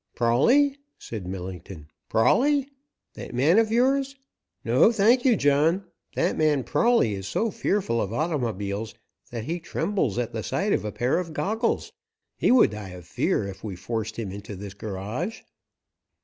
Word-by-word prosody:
"Prawley?" 245 - +3 0.2
said 105 -6 -7
Millington. 90 -3 -7 0.2
"Prawley? 275 - +3 0.5
That - - -8
man 155 - +4
of 220 -1 +1
yours? 270 +3 +2 0.5
No, 125 - +5
thank 235 +3 +4
you, 250 -3 +5
John. 155 +5 +2 0.3
That - - +1
man 150 -4 +2
Prawley 230 - +2
is 95 -1 -5
so 220 - 0
fearful 185 - 0
of 100 - -3
automobiles 115 - -2 0.3
that 115 -2 -5
he 170 +7 -3
trembles 165 - -1
at 120 -1 -2
the 110 - -3
sight 195 - -1
of - - 0
a 105 - -3
pair 125 +9 0
of 165 -3 -5
goggles. 220 +7 -1 0.4
He - - +1
would 250 - +6
die 105 -2 -7
of 90 -2 -10
fear 100 - 0
if 95 - -9
we 105 -4 -5
forced 110 +3 -4
him 110 -5 -4
into 100 +1 -8
this 100 +1 -8
garage." 105 - -5
125 Hz, 160 wpm, -25 LUFS, -, 0.5 s, would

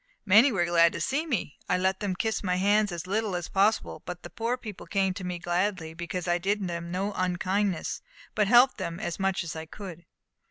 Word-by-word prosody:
"Many 220 +7 +6
were 175 -5 +1
glad 170 -1 +4
to - - -4
see 290 +5 -1
me. 220 - -2
I 180 - +3
let 190 +1 +1
them 200 -3 -2
kiss 220 +4 -1
my 180 -2 +1
hands 205 +2 +3
as 175 0 -5
little 205 0 -1
as 175 -1 -3
possible; 200 +3 +1
but 180 0 -7
the 175 - -9
poor 235 +4 -1
people 215 -6 -9
came 195 -2 +1
to 195 -1 -7
me 180 -1 -3
gladly, 175 -1 -1
because 175 +1 -4
I 175 0 +2
did 200 +2 0
them 170 0 -4
no 195 +3 -2
unkindness, 185 +1 -1 0.3
but 210 -2 +2
helped 245 +4 +6
them 170 0 -4
as 170 - -4
much 195 -2 0
as 165 - -6
I 160 0 -6
could." 175 -2 -9
185 Hz, 215 wpm, -28 LUFS, 175-210 Hz, 0.3 s, Many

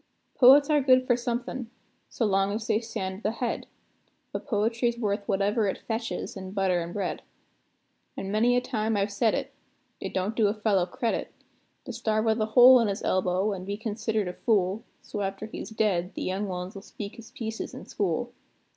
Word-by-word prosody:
Poets 275 +3 +7
are 295 -1 +4
good 255 -1 +5
for 245 - +3
somethin', 240 0 -3 0.4
so 230 - -1
long 195 -1 +2
as 215 +1 -3
they 220 -2 +2
stand 190 -5 -4
at - - -13
the 215 - +1
head: 235 0 -3 0.6
But - - -5
poetry's 230 +1 +1
worth 205 -3 -2
whatever 205 +2 +1
it 195 - -1
fetches 225 0 -4
in 190 -1 -7
butter 190 -3 +1
an' 170 +1 -5
bread. 190 -1 -3 1.0
An' 195 - -4
many 235 +4 +3
a - - +2
time 220 -3 -1
I've 200 +1 0
said 220 +2 +2
it: - - -4 0.5
it - - -5
don't 190 +4 -1
do 220 -2 +3
a 205 - 0
fellow 205 -4 +1
credit, 230 +3 -2 0.5
To 250 - -6
starve 220 -1 0
with 220 0 +2
a 215 - +1
hole 250 +3 +8
in 230 - +2
his 200 -1 -3
elbow, 185 +2 +1
an' 185 -2 -6
be 200 +2 -4
considered 220 -1 -2
a 180 - -4
fool, 200 0 +1 0.2
So 210 - -5
after 195 +1 -3
he's 220 - -7
dead, 200 -5 0
the - - -3
young 195 +3 -2
ones 180 0 -5
'll 195 - -7
speak 205 +1 -8
his 230 -1 -11
pieces 225 -1 -5
in - - -9
school. - - -2
215 Hz, 200 wpm, -27 LUFS, 195-230 Hz, 1.0 s, hole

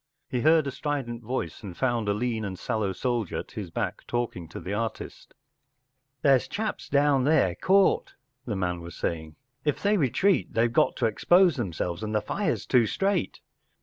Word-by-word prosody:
He 125 - -2
heard 155 +1 +5
a 140 - -2
strident 135 -5 -3
voice, 110 -8 -4
and 95 -5 -8
found 120 -5 0
a - - +3
lean 115 0 -1
and 95 -2 -4
sallow 105 +1 -1
soldier 120 -1 -2
at - - -6
his - - -6
back - - -3
talking 120 -8 -3
to 80 - -8
the 95 - -5
artist. 110 +2 -5 0.9
“There’s 135 -3 +4
chaps 215 0 -4
down 140 -2 +3
there 140 - +3
caught,” 190 - +2 0.3
the 110 - -1
man 90 -2 -2
was 85 0 -9
saying. 80 -2 -3 0.2
“ 125 - -48
If 150 -2 -1
they 205 +1 +3
retreat 170 - +1
they 115 +1 +3
got 115 - +2
to - - 0
expose 175 - +4
themselves, 90 - -3
and 110 0 -3
the - - +4
fire’s - - -2
too 120 -3 +3
straight. 195 - -1
120 Hz, 180 wpm, -27 LUFS, 100-145 Hz, 0.9 s, heard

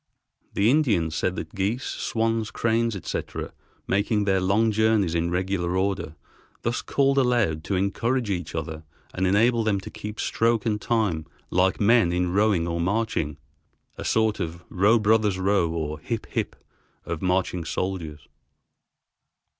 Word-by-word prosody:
The 105 +4 +3
Indians 105 - +2
said 95 +1 0
that - - -6
geese, 105 +6 -1
swans, 115 -1 -1
cranes, 115 0 0
etc., 95 - -5 0.3
making 105 +2 +1
their 95 -2 +2
long 105 +4 +2
journeys 110 -5 +2
in 85 0 0
regular 90 0 -1
order 95 -5 -1 0.5
thus 120 +1 -1
called 140 0 +2
aloud 120 -12 +1
to 100 - -1
encourage 115 +5 0
each 90 -3 -3
other 80 -1 -4 0.3
and 95 0 0
enable 115 +4 +3
them 105 -3 +1
to - - -9
keep 105 +1 -7
stroke 115 -1 +1
and 105 -2 0
time 105 -11 0 0.2
like 95 +1 +2
men 110 -4 +4
in 90 0 0
rowing 100 -4 +2
or 85 0 -1
marching 90 -6 -1 0.6
(a - - -7
sort 110 -2 +1
of 85 -1 -4
"Row, 105 +5 +4
brothers, 105 -2 +2
row," 95 -2 +2
or 80 -2 -3
"Hip, 115 -2 -4
hip" - - -2 0.5
of 85 -2 -4
marching 90 -1 0
soldiers). 80 -3 -4
100 Hz, 145 wpm, -25 LUFS, 90-110 Hz, 0.6 s, men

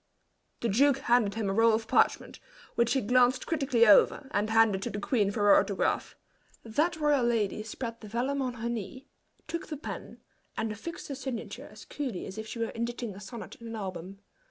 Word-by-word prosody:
The 235 - 0
duke 270 +6 +4
handed 240 -6 +2
him 220 -2 -2
a 195 - 0
roll 225 +2 +5
of 225 0 -4
parchment, - - +1 0.3
which 235 0 +2
he 265 - +1
glanced 250 +3 +3
critically 275 -7 +2
over, 225 +5 +5
and 205 +1 0
handed 220 -3 +4
to - - -3
the 205 - -4
queen 205 -1 +1
for 205 +1 -3
her 205 -1 +7
autograph. 200 0 -1 0.5
That 305 +10 0
royal 295 -4 +2
lady 220 -3 0
spread 230 +2 -6
the 215 - -9
vellum 255 +6 -1
on 250 -2 -2
her 230 0 -4
knee, 235 +4 -5 0.4
took 335 +1 -4
the 305 - -5
pen 290 - -8 0.4
and 220 - -1
affixed 275 +11 -7
her - - -3
signature 260 -4 -6
as - - -13
coolly 260 -11 -4
as 195 - -7
if 220 - -6
she 235 - -7
were 230 -1 -1
inditing 235 -1 -4
a 190 - -10
sonnet 210 +3 -9
in 230 - -8
an 225 - -6
album. 190 -2 -6
230 Hz, 205 wpm, -29 LUFS, 210-260 Hz, 0.5 s, her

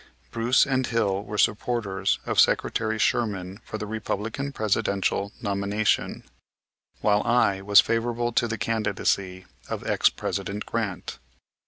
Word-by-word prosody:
Bruce 115 +2 +3
and 130 -2 0
Hill 100 -4 0
were 105 0 -6
supporters 105 -3 +1
of - - 0
Secretary 110 -1 +2
Sherman 100 -3 -1
for 110 - -6
the 105 - -5
Republican 110 +5 -3
Presidential 100 -3 0
nomination, 100 +1 0 0.8
while 105 0 +3
I 110 -5 +2
was 100 +1 +7
favorable 120 +1 -1
to 120 0 +1
the 115 0 -3
candidacy 100 -4 -1 0.2
of - - -4
ex - - +3
President 100 +1 -4
Grant. 105 - -4
105 Hz, 125 wpm, -25 LUFS, 100-115 Hz, 0.8 s, was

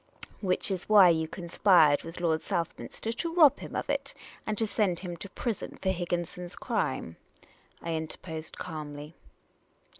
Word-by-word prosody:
" - - -30
Which 190 0 0
is 185 0 -3
why 200 -4 +9
you 160 -1 +2
conspired 170 -3 +4
with 165 +1 -8
Lord 160 -2 +1
Southminster 185 +4 -3
to 330 +8 -3
rob 300 -5 +7
him - - -8
of - - -2
it, - - -2 0.3
and 215 -1 -1
to 225 - +1
send 200 -5 0
him 175 -2 -5
to 195 - -8
prison 230 +1 -4
for 190 - 0
Higginson's 175 -1 -3
crime," 85 - -2 0.7
I 165 - -2
interposed 160 0 -5
^almly. 150 -2 -6
175 Hz, 155 wpm, -29 LUFS, 160-200 Hz, 0.7 s, why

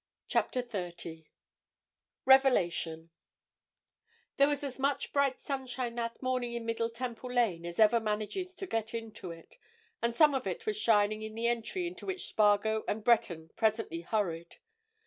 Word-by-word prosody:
CHAPTER 250 - 0
THIRTY 175 -7 -6 1.0
REVELATION 175 -11 +3 1.3
There 280 - +6
was 290 -1 -1
as 270 -2 -5
much 275 +1 0
bright 280 -2 +2
sunshine 260 -3 -3
that 235 +1 -4
morning 255 -2 -1
in 235 -1 -4
Middle 230 0 -1
Temple 245 +1 -5
Lane 200 -9 +1
as 170 - -7
ever 220 +2 +6
manages 220 - -3
to 385 - -5
get 225 - -2
into 225 -5 -6
it, 165 - -12 0.4
and 235 - +1
some 295 +4 +5
of 265 -1 -1
it - - -4
was 430 -1 0
shining 215 - +3
in 220 0 -6
the 230 +1 -2
entry 240 - 0
into 355 +2 -7
which 380 -1 -3
Spargo 215 +1 +3
and 210 +1 -2
Breton 205 -9 +2
presently 220 -7 0
hurried. 170 -3 -2
230 Hz, 150 wpm, -31 LUFS, 210-260 Hz, 1.3 s, There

